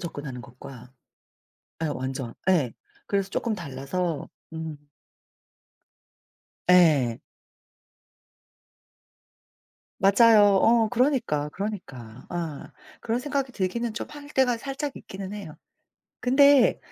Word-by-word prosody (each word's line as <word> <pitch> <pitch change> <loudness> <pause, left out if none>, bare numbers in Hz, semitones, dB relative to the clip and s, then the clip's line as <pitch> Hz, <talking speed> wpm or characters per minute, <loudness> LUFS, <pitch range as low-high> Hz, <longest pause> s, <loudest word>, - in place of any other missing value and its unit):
접근하는 145 -7 -6
것과 125 0 -12 0.9
예 - - +1
완전 130 -3 -4 0.2
예. 150 -11 +3 0.4
그래서 195 -1 0
쪼끔 225 +1 -2
달라서 155 +1 -4 0.2
음. 160 -2 -5 1.9
예. 150 -10 +5 2.8
맞아요. 205 0 +6
어 225 -1 +4
그러니까, 235 - +1
그러니까. 135 - -7
아. 165 -5 -5 0.3
그런 230 +2 -1
생각이 275 -1 -2
들기는 220 +4 -2
좀 - - -5
할 290 -1 -11
때가 255 -4 +2
살짝 275 +3 -5
있기는 195 0 -8
해요. 195 -7 -8 0.7
근데 275 +1 +5
190 Hz, 190 characters per minute, -26 LUFS, 145-235 Hz, 2.8 s, 맞아요